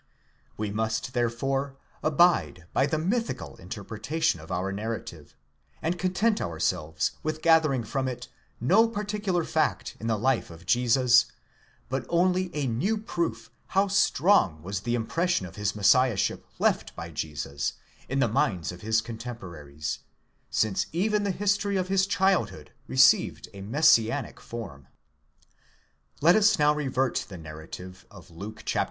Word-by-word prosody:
We 105 -1 -2
must 110 +3 -2
therefore 135 +3 -1 0.3
abide 135 - +3
by 135 - +3
the 155 - 0
mythical 225 +9 -2
interpretation 110 - -2
of 80 +3 -11
our 90 +2 -1
narrative, 100 -7 -6 0.4
and 175 +2 -2
content 195 +4 +1
ourselves 80 -1 -1
with 155 0 -3
gathering 155 -6 +4
from 130 +4 -2
it 125 -2 -5 0.3
no 195 - +4
particular 205 -4 -2
fact - - -1
in 115 - -4
the 110 -1 +1
life 130 +3 +1
of 85 +1 -13
Jesus, 120 +2 +4 0.6
but 130 +1 -2
only 180 +1 +2
a 145 -2 -1
new 135 - 0
proof 170 - -3 0.3
how 200 +1 +5
strong 170 - +3
was 95 +2 -3
the 120 +5 -1
impression 165 - 0
of 90 - -10
his 105 0 -1
messiah 120 +2 +4
ship - - -1
left - - 0
by 85 0 -7
Jesus 70 -3 -3 0.4
on 135 - -1
the 130 -3 +3
minds 95 -6 0
of 90 0 -11
his 110 +1 +2
contemporaries, 85 - -6 0.5
since 110 -3 0
even 210 +6 +1
the 205 - -1
history 200 +1 0
of 185 0 -1
his 195 0 +2
childhood 170 - 0 0.2
received - - +4
a 100 - -9
messianic 120 +1 +3
form.® 85 - -8 1.3
Let 170 +4 +6
us 210 -1 +5
now 150 -1 +4
revert 135 -3 0
to - - -4
the 95 - -8
narrative 85 +4 -10
of 95 -5 -15
Luke, 100 +6 -9
chap. - - 0
120 Hz, 145 wpm, -27 LUFS, -, 1.3 s, Let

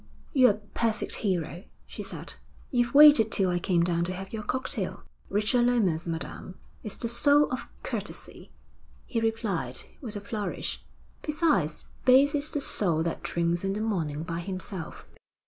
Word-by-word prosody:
'You're 255 -4 +6
a - - +3 0.2
perfect 225 -2 0
hero,' 175 -3 -2 0.2
she - - -8
said. - - -5 0.4
'You've 240 -1 +1
waited 290 -7 +8
till 190 -3 +3
I 175 - 0
came 175 -2 +2
down 170 -1 +1
to 185 - -3
have 190 +2 -8
your 220 - -3
cocktail.' 260 +5 -3 0.3
'Richard 225 +4 +2
Lomas, 190 -10 +1
madam, 165 +2 -4 0.3
is 215 - -4
the 235 - -1
soul 285 +5 +4
of 255 - -4 0.2
courtesy,' - - -6 0.5
he 230 -3 -2
replied, 205 - -1 0.2
with 230 -6 -5
a - - -3
flourish. 205 0 -4 0.4
'Besides, 300 - 0 0.2
base 265 +3 +6
is 295 +1 -1
the 290 - -2
soul 170 - +2
that 170 - -3
drinks 170 +1 -1
in 195 0 0
the 205 - -3
morning 160 -9 -2
by 165 0 -4
himself. 185 -1 -6
205 Hz, 160 wpm, -28 LUFS, 175-245 Hz, 0.5 s, waited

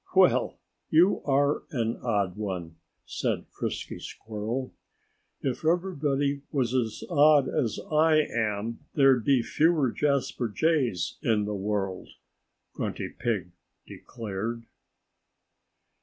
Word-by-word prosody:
"Well, - - +4 0.3
you 175 +5 +4
are 140 +1 +2
an 115 -4 -1
odd 100 -6 -1
one," 90 -6 -5 0.3
said - - -2
Frisky - - -4
Squirrel. 110 +4 -5 0.7
"If 130 +1 -2
everybody 145 -5 0
was 130 -5 0
as 115 -4 -1
odd 150 -3 +5
as 125 -8 -1
I 155 0 +5
am 110 -3 -2 0.2
there'd 135 -4 +5
be 130 -1 +3
fewer 155 -4 +2
Jasper 140 -4 0
Jays 130 - 0
in 105 -2 +1
the 105 - -3
world," 100 -2 -2 0.6
Grunty - - -3
Pig 105 -7 -2 0.3
declared. 115 +1 -5
120 Hz, 105 wpm, -27 LUFS, 105-145 Hz, 0.7 s, odd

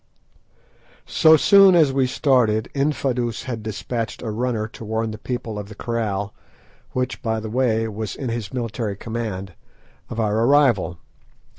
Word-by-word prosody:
So 160 0 +5
soon 195 +3 +7
as 155 -5 +4
we 135 -1 +2
started 125 -5 +2
Infadoos 130 -5 -1
had 120 -4 -5
despatched 110 +2 -4
a 110 - -3
runner 115 -1 -1
to 115 - -11
warn 110 +1 -2
the 110 - -8
people 115 -4 -4
of 100 0 -8
the 105 - -10
kraal, 105 -3 -2 0.6
which, 125 0 -2
by 110 -3 -1
the 110 0 -6
way, 115 -2 +1
was 110 -1 -5
in 130 - -4
his 115 -3 -4
military 115 -4 -3
command, 105 -4 -5 0.6
of 115 - -5
our 110 -1 +1
arrival. 120 - +3
115 Hz, 150 wpm, -22 LUFS, 110-130 Hz, 0.6 s, soon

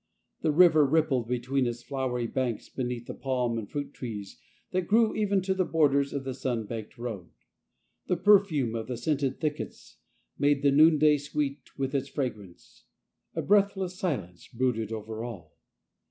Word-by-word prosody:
The 160 - +2
river 160 -1 +6
rippled 140 -5 +2
between 125 +2 0
its 120 0 -5
flowery 130 -3 -2
banks 120 -2 -2
beneath 125 -2 -4
the - - -6
palms 125 -3 -1
and 105 - -7
the - - -28
fruit 145 -1 -4
trees 105 -6 -7 0.3
that 180 -1 -1
grew 225 +1 +4
even 200 -3 +1
to 190 0 +1
the 190 0 +1
borders 140 -5 +2
of 140 - -3
the 130 -1 -4
sun 125 -4 -2
baked 110 0 -7
road. 110 -8 -6 0.8
The 180 - +1
perfume 180 - +4
of 115 -1 -4
the 125 -2 -4
scented 145 -3 -1
thickets 150 -2 -5 0.4
made 145 -1 +2
the 140 - +5
noonday 155 0 +6
sweet 145 -1 -4
with 135 0 -2
its 140 0 -1
fragrance; 110 - -6 0.5
a - - -1
breath 200 0 +3
less 185 -1 -4
silence 100 - -3
brooded 115 -3 -1
over 110 0 -5
all. 115 -8 -8
135 Hz, 170 wpm, -28 LUFS, 120-155 Hz, 0.8 s, river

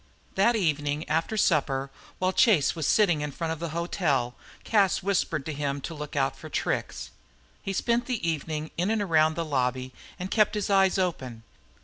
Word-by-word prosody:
That 215 +5 +3
evening 150 -5 0
after 165 +8 0
supper, 140 -7 +1 0.3
while 185 0 0
Chase 190 - +4
was 160 -4 -2
sitting 175 -8 +3
in 150 - -2
front 160 +3 -3
of 160 - -8
the 170 0 -3
hotel, 155 -7 -1 0.3
Cas 200 -6 +2
whispered 175 -7 0
to 160 - -3
him 140 -1 -2
to 165 - -5
look 150 -1 -7
out 135 -1 +1
for - - -10
tricks. - - -3 0.5
He 195 - -4
spent 235 +5 0
the 235 -9 -2
evening 155 -1 -3
in 180 +4 0
and 220 -2 +1
around 160 -4 +3
the 170 - -2
lobby 130 -3 -1 0.2
and 185 +2 -5
kept 215 -1 +3
his 210 0 -1
eyes 195 -1 +4
open. 130 -11 -2
165 Hz, 180 wpm, -27 LUFS, 145-195 Hz, 0.5 s, Chase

